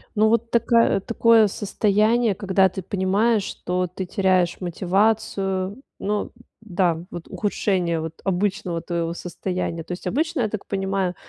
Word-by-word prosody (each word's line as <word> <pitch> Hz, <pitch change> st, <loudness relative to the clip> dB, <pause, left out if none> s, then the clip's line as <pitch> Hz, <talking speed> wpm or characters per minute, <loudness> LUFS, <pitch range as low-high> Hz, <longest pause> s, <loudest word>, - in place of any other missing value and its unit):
Ну, 215 Hz, +1 st, +4 dB
вот 230 Hz, +1 st, +1 dB
такая 235 Hz, -2 st, +3 dB
такое 230 Hz, +1 st, +4 dB
состояние, 210 Hz, +2 st, +1 dB
когда 190 Hz, 0 st, +3 dB
ты 190 Hz, +1 st, -6 dB
понимаешь, 200 Hz, +4 st, +1 dB
что 180 Hz, -1 st, -2 dB
ты 180 Hz, +1 st, -6 dB
теряешь 185 Hz, -2 st, +1 dB
мотивацию. 195 Hz, +2 st, 0 dB, 0.2 s
Ну 205 Hz, 0 st, -2 dB, 0.3 s
да, 175 Hz, -5 st, 0 dB
вот 175 Hz, -, -8 dB
ухудшение 185 Hz, -5 st, 0 dB
вот 160 Hz, 0 st, -5 dB
обычного 190 Hz, -2 st, -1 dB
твоего 170 Hz, -1 st, -2 dB
состояния. 175 Hz, -2 st, -4 dB
То -, -, -7 dB
есть 180 Hz, -, -7 dB
обычно, 310 Hz, -, 0 dB
я 220 Hz, -, +1 dB
так 215 Hz, -1 st, -5 dB
понимаю, 195 Hz, -2 st, -1 dB
195 Hz, 140 wpm, -23 LUFS, 180-215 Hz, 0.3 s, Ну